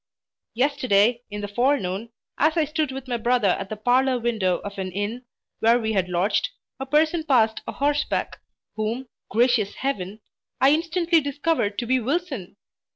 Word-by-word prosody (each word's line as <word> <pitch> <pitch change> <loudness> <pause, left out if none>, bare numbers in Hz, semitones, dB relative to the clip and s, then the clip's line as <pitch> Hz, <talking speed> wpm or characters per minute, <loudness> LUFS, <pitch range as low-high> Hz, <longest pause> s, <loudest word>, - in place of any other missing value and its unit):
Yesterday 240 -3 +2
in 205 0 -5
the 205 - -3
forenoon, 230 -2 0 0.3
as 310 +3 +3
I 320 - +3
stood 305 -1 -1
with 265 0 -7
my 245 -2 -1
brother 235 -2 +2
at 195 +1 -1
the 215 - -4
parlour 255 +3 +2
window 220 -7 0
of 200 -1 -7
an 185 -1 -3
inn, 205 +6 -4 0.3
where 230 +2 +4
we 220 -2 -1
had 185 -3 0
lodged, 180 - +1 0.3
a 270 - -5
person 315 +3 +2
passed 230 -7 +2
a - - -4
horseback, 290 +1 -1 0.4
whom 225 +4 -3 0.2
(gracious 230 -2 +2
Heaven!) 210 -6 -3 0.4
I 270 +1 +5
instantly 335 +1 +2
discovered 285 -7 -1
to 240 - -2
be 260 +2 +2
Wilson! 265 - -3
245 Hz, 160 wpm, -24 LUFS, 205-280 Hz, 0.4 s, I